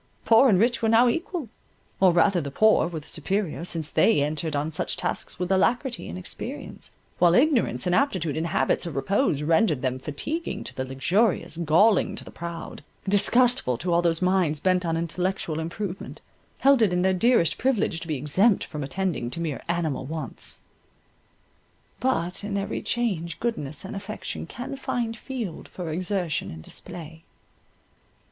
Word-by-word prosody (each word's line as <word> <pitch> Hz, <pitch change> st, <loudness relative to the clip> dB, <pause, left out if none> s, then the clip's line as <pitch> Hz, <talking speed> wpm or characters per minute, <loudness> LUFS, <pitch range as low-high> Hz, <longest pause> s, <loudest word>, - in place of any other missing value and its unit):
Poor 230 Hz, +4 st, +6 dB
and 195 Hz, -, +5 dB
rich 240 Hz, +3 st, +2 dB
were 225 Hz, -, +2 dB
now 230 Hz, +2 st, +6 dB
equal, 330 Hz, +2 st, -2 dB, 0.5 s
or 190 Hz, -1 st, +6 dB
rather 175 Hz, +1 st, +3 dB
the 140 Hz, -, -4 dB
poor 215 Hz, +2 st, +4 dB
were 170 Hz, -2 st, -5 dB
the -, -, -16 dB
superior, 180 Hz, 0 st, -2 dB
since 165 Hz, -3 st, -1 dB
they 220 Hz, -11 st, +4 dB
entered 155 Hz, +1 st, -2 dB
on 145 Hz, +2 st, -1 dB
such 155 Hz, -, -2 dB
tasks -, -, -3 dB
with 180 Hz, +2 st, -2 dB
alacrity 235 Hz, +6 st, +1 dB
and 85 Hz, -, -6 dB
experience; 90 Hz, -, -5 dB, 0.3 s
while 175 Hz, -1 st, +5 dB
ignorance, 245 Hz, -, +2 dB
inaptitude, 180 Hz, -, +1 dB
and 160 Hz, +1 st, -1 dB
habits 170 Hz, -, +1 dB
of 165 Hz, -, -6 dB
repose, 150 Hz, -, +1 dB
rendered 160 Hz, -, +2 dB
them 130 Hz, 0 st, -1 dB
fatiguing 160 Hz, -, -4 dB
to -, -, -6 dB
the 130 Hz, -, -3 dB
luxurious, 170 Hz, -, +1 dB
galling 170 Hz, +6 st, +3 dB
to -, -, -4 dB
the -, -, -11 dB
proud, 170 Hz, 0 st, -7 dB, 0.2 s
disgustful 205 Hz, -, +3 dB
to 175 Hz, +7 st, -1 dB
all 170 Hz, -, +4 dB
whose 170 Hz, 0 st, +1 dB
minds, 180 Hz, -5 st, +2 dB
bent 185 Hz, +3 st, +2 dB
on 165 Hz, 0 st, 0 dB
intellectual 170 Hz, -1 st, -2 dB
improvement, 175 Hz, +3 st, -5 dB, 0.4 s
held 275 Hz, -2 st, +4 dB
it 180 Hz, -5 st, +3 dB
their 190 Hz, 0 st, +3 dB
dearest 185 Hz, -4 st, +3 dB
privilege 235 Hz, -10 st, +1 dB
to 165 Hz, -, -8 dB
be 155 Hz, -, -1 dB
exempt 185 Hz, -, +3 dB
from 150 Hz, -, -6 dB
attending 170 Hz, -4 st, -2 dB
to 165 Hz, -, -5 dB
mere 160 Hz, -5 st, -3 dB
animal 160 Hz, -6 st, -1 dB
wants. 155 Hz, +1 st, -5 dB, 1.4 s
But 185 Hz, -9 st, -1 dB
in 205 Hz, -1 st, -2 dB
every 200 Hz, 0 st, -3 dB
change 190 Hz, -9 st, -1 dB
goodness 155 Hz, -, -3 dB
and 195 Hz, -, -6 dB
affection 200 Hz, +2 st, -6 dB
can 270 Hz, +3 st, -6 dB
find 235 Hz, -4 st, -2 dB
field 230 Hz, -6 st, -6 dB
for 175 Hz, -3 st, -6 dB
exertion 180 Hz, -1 st, -2 dB
and 80 Hz, 0 st, -9 dB
display. 160 Hz, -, -8 dB
180 Hz, 165 wpm, -25 LUFS, 160-220 Hz, 1.4 s, Poor